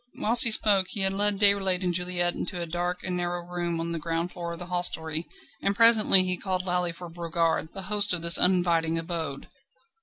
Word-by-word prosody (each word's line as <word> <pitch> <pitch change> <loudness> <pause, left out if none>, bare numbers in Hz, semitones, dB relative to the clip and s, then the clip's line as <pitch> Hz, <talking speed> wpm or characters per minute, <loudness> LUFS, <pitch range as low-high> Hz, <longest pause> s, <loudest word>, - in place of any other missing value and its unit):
Whilst 230 +2 +6
he - - +5
spoke 205 -3 +3
he 205 - -3
had 190 0 +3
led 205 +1 +2
Déroulède 195 -2 +2
and 180 -1 -2
Juliette 175 0 -2
into 180 0 -6
a 170 - -4
dark 175 +2 -5
and 180 -1 -4
narrow 175 0 -4
room 175 -1 -4
on 165 0 -2
the 165 - -4
ground 165 +2 -4
floor 170 -1 -7
of - - -9
the 175 - -8
hostelry, 170 -2 -3 0.3
and 200 - -2
presently 220 -4 +6
he 185 -1 -2
called 185 -1 -4
loudly 180 -1 -1
for 175 +1 -11
Brogard, 165 -1 -3
the 195 - -8
host 205 +1 -1
of 175 -2 -2
this 170 0 +5
uninviting 170 -3 +1
abode. 165 -4 -5
175 Hz, 210 wpm, -25 LUFS, 170-190 Hz, 0.3 s, Whilst